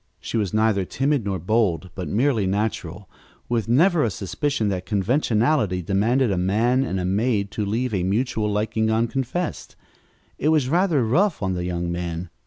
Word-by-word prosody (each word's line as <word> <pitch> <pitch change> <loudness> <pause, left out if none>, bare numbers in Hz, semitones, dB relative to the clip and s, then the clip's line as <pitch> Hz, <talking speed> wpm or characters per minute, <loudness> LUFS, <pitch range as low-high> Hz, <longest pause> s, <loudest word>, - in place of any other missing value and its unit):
She - - -6
was 105 -5 0
neither 110 -2 +2
timid 135 +4 -1
nor 100 -2 -1
bold, 95 -2 0
but 90 - -5
merely 115 -2 +1
natural, 100 -2 -3 0.4
with 115 -3 -1
never 165 +6 +4
a 115 - +1
suspicion 105 +5 -2
that 90 -2 -2
conventionality 110 - +1
demanded 110 +7 +1
a 95 - 0
man 115 +8 +2
and 95 -8 -2
a 90 - -2
maid 100 +1 0
to 105 - -2
leave 115 +3 -1
a 95 - 0
mutual 105 +2 0
liking 110 +1 0
unconfessed. 125 +9 -2 0.6
It 150 - +1
was 150 -5 +2
rather 165 -5 +2
rough 165 - +1
on 95 -1 0
the 90 -1 -3
young 85 -1 -2
man. 85 0 -4
110 Hz, 170 wpm, -23 LUFS, 95-125 Hz, 0.6 s, never